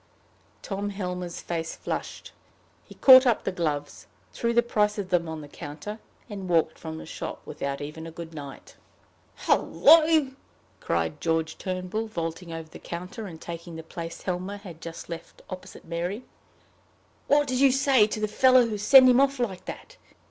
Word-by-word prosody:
Tom 200 0 -3
Helmer's 180 -3 -5
face 165 -1 -4
flushed. - - -5 0.5
He - - -14
caught 260 -1 +8
up 235 - +2
the - - -1
gloves, 150 -5 -3 0.3
threw 235 - -1
the 240 0 +4
price 210 -3 +1
of 195 -3 -4
them 170 -3 +1
on 160 -1 -5
the 145 - -10
counter, 165 +9 -8 0.3
and 195 -5 -7
walked 165 -2 +2
from 160 -1 -6
the - - -8
shop, - - -6
without 140 0 -4
even 155 +3 -7
a - - -8
good 165 0 -9
night. 140 -3 -10 0.7
"Hullo!" 315 -2 +5 0.5
cried 80 -1 -2
George 160 -1 0
Turnbull, 185 +4 -3
vaulting 170 -3 -5
over 165 -1 -7
the - - -12
counter, 180 +5 -7
and 165 -3 -10
taking 170 0 -8
the 160 - -7
place 165 0 -7
Helmer 185 +2 -3
had 175 -6 -11
just 165 -1 -8
left 170 -1 -9
opposite 185 0 -9
Mary; 175 +7 -3 1.0
"what 290 0 +4
did 255 -1 -1
you 275 -1 +6
say 265 -4 +4
to 215 - -4
the 215 - 0
fellow 255 +2 +5
to 215 -2 -4
send 260 +5 +8
him 250 +1 +6
off 275 0 +2
like 205 -7 -3
that? - - -9
185 Hz, 170 wpm, -26 LUFS, 165-225 Hz, 1.0 s, caught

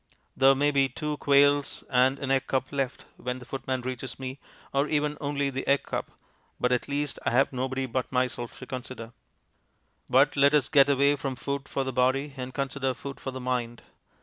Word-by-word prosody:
There 135 +1 +6
may 145 +2 +2
be 135 -1 +3
two 150 +3 -3
quails 145 0 +3
and 130 +2 +3
an 140 -1 -3
egg 135 -1 +2
cup 130 -1 -1
left 135 -3 -2
when 125 +1 -3
the 125 - -11
footman 130 0 -3
reaches 130 0 -5
me, 130 +1 -6 0.3
or 140 +2 +2
even 150 0 0
only 140 -1 -1
the 135 0 -4
egg 140 0 +3
cup, - - -4 0.5
but 125 - +1
at 125 - +1
least 145 0 -2
I - - +1
have 135 +3 +2
nobody 130 +1 -2
but 130 0 -3
myself 125 -2 -1
to 130 - -9
consider. 125 -2 -7 1.0
But 135 +3 +4
let 140 +1 +5
us 145 -4 +2
get 140 -1 +6
away 140 +1 +3
from 135 -2 -3
food 140 +2 -4
for 135 - -1
the 130 0 -4
body, 130 +3 +1
and 130 -1 -5
consider 135 -1 -2
food 140 +2 -8
for - - -5
the 130 0 -6
mind. 125 -2 -2
135 Hz, 200 wpm, -27 LUFS, 130-140 Hz, 1.0 s, There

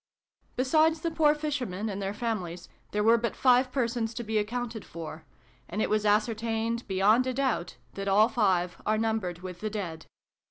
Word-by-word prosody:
Besides 310 +5 +3
the 335 - -1
poor 305 -2 +4
fishermen 255 -10 -3
and 200 -1 -4
their 195 0 -2
families, 185 -7 -4 0.2
there 210 0 0
were 230 +2 +5
b^lt 235 0 -2
five 255 0 +4
persons 235 -3 -1
to 240 - -4
be 220 -1 0
accounted 230 +1 -3
for: 160 -1 -8 0.4
and 200 - -4
it - - 0
was 215 0 +2
ascertained, 225 +2 0
beyond 210 +6 +3
a 255 - -1
doubt, 255 -10 -1 0.2
that 195 0 -5
all 205 +3 +5
five 185 -7 +1
are 215 0 +1
numbered 215 -6 -1
with 180 -1 -7
the 215 - -2
dead. 180 -7 -5
220 Hz, 175 wpm, -28 LUFS, 195-245 Hz, 0.4 s, were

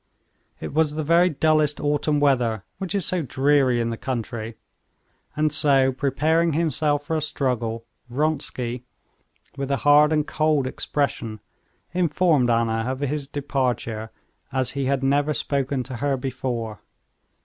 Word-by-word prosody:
It - - -6
was 155 -1 +1
the 155 - -2
very 170 +4 +4
dullest 155 -1 +2
autumn 150 0 +1
weather, 125 -8 +2 0.2
which 190 +1 -3
is 195 - +1
so 180 -1 0
dreary 135 -3 +2
in 115 0 -1
the 115 - -4
country, 115 -3 -4 0.8
and 155 -1 +1
so, 135 -3 +4
preparing 155 +5 +1
himself 150 -2 0
for 160 - -2
a 155 - 0
struggle, 120 -6 -1 0.2
Vronsky, 125 -3 -2 0.7
with 140 -1 -3
a 140 - +1
hard 150 +1 +6
and 150 -1 +2
cold 155 -4 +1
expression, 130 -5 -2 0.5
informed 165 -6 +2
Anna 115 -1 +1
of 130 +1 -5
his 145 0 -2
departure 125 -6 -2 0.4
as 130 -1 0
he 140 0 -2
had 135 0 0
never 145 +2 +2
spoken 140 -2 -1
to 130 -1 -7
her 140 +2 0
before. 125 -5 -4
140 Hz, 140 wpm, -23 LUFS, 125-150 Hz, 0.8 s, hard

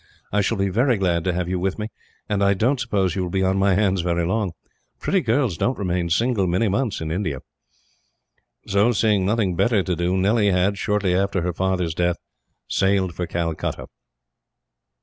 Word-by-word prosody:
I 105 - +2
shall 110 +3 0
be 100 0 +1
very 120 +5 +2
glad 85 -4 0
to 90 - +1
have 90 0 -2
you 90 0 -1
with 95 +1 -1
me, 110 0 -4 0.4
and 100 -1 0
I 100 0 +3
don't 125 +7 +1
suppose 95 -6 0
you 95 - -1
will 90 - -2
be 95 +2 0
on 95 +1 +1
my 95 -1 +3
hands 95 -2 +2
very 85 0 0
long; 95 0 -1 0.5
pretty 195 - +1
girls 120 - 0
don't 125 - 0
remain 90 -3 -1
single 105 +2 +1
many 90 +6 +1
months, 110 +1 -1
in 80 -1 -3
India." 80 -7 -2 1.2
So, 100 +5 +2
seeing 105 -4 +2
nothing 105 -4 +1
better 110 +1 +2
to 90 -1 -1
do, 90 +2 0
Nellie 105 +2 +2
had, 95 +2 +1
shortly 105 -3 0
after 95 -1 0
her 90 0 -1
father's 90 -2 -1
death, 85 +1 0 0.5
sailed 95 -2 +1
for 90 +1 -4
Calcutta. 85 -2 -3
95 Hz, 190 wpm, -22 LUFS, 90-105 Hz, 1.2 s, I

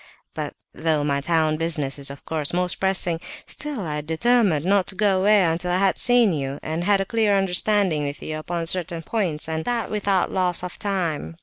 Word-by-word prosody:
But - - -5 0.2
though 155 -2 0
my 140 -1 0
town 155 0 +1
business 155 -4 -1
is, 140 - -1
of 140 0 -10
course, 155 -2 -2
most 180 0 0
pressing, 190 -3 +1 0.3
still 295 -6 -4
I 150 -4 -3
determined 165 0 +1
not 195 -1 +2
to 195 - -5
go 200 -2 +2
away 205 +1 +4
until 170 +1 -1
I 180 - +2
had 190 -3 +2
seen 245 -5 +5
you, 140 -2 -3
and 160 +2 -3
had 200 -1 +3
a - - -2
clear 215 -1 +2
understanding 190 -3 +2
with 140 0 -6
you 155 0 -4
upon 170 +1 -4
certain 170 -1 +1
points; 175 -10 -2
and 160 0 -3
that 240 -2 -2
without 200 -3 0
loss 180 -2 +1
of 180 - -7
time. 175 -6 -2
175 Hz, 200 wpm, -23 LUFS, 155-200 Hz, 0.3 s, seen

